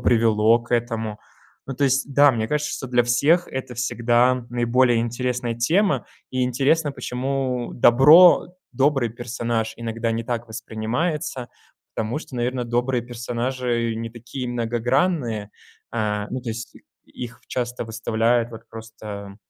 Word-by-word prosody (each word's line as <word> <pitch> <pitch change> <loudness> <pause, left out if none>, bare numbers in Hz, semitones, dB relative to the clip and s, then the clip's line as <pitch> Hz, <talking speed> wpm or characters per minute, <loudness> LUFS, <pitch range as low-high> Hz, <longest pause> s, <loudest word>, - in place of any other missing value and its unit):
привело 115 -1 +4
к 120 +1 -2
этому. 115 -3 -2 0.5
Ну 135 - -5
то 140 - +1
есть, 135 +1 +1
да, 145 +1 +7
мне 110 -1 -2
кажется, 150 0 -1
что 135 - -5
для 125 -1 +3
всех 145 +9 +3
это 130 -1 -6
всегда 120 +1 +1
наиболее 120 0 +2
интересная 120 0 -2
тема, 175 - +1 0.2
и 130 0 -1
интересно, 140 +5 +1
почему 130 -1 -3
добро 150 +10 +7 0.3
добрый 135 -3 +2
персонаж 115 -1 -3
иногда 115 0 -3
не 115 0 -2
так 120 0 -3
воспринимается. 120 +5 -3 0.5
Потому 110 +6 -2
что 135 - -9
наверное 125 +1 -1
добрые 120 +1 0
персонажи 120 0 -2
не 115 0 -4
такие 120 +2 -7
многогранные, 120 - 0 0.4
а, 105 -2 -1
ну 130 - -3
то 120 - -7
есть 115 0 -6 0.3
их 120 -1 -9
часто 125 -1 -3
выставляют 115 +1 0
вот 115 -1 -10
просто 105 -3 -9
120 Hz, 135 wpm, -23 LUFS, 115-130 Hz, 0.5 s, да